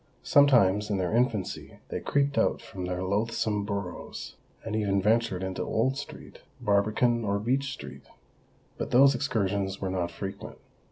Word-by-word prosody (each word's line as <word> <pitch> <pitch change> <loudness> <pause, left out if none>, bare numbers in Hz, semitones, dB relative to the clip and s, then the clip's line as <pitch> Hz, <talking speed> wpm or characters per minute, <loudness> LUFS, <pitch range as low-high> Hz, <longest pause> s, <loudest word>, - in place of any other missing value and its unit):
Sometimes 105 -8 +4
in 100 - 0
their 95 +3 -1
infancy 115 -6 -1
they - - -3
creeped 140 0 0
out - - +2
from 90 -2 -7
their 90 0 -3
loathsome 105 +1 0
burrows, 100 -3 -5 0.3
and 110 - -3
even 100 -2 +1
ventured 105 -2 +1
into 95 0 -3
Old 130 +4 0
Street, 145 +1 -9 0.2
Barbican, 110 +4 +2
or 100 -1 0
Beech 130 +6 0
Street. - - -9 0.7
But - - -3
those 135 +3 +6
excursions 100 -6 -1
were 95 -1 -2
not 90 -2 -1
frequent. 95 +3 -7
105 Hz, 150 wpm, -28 LUFS, 95-120 Hz, 0.7 s, those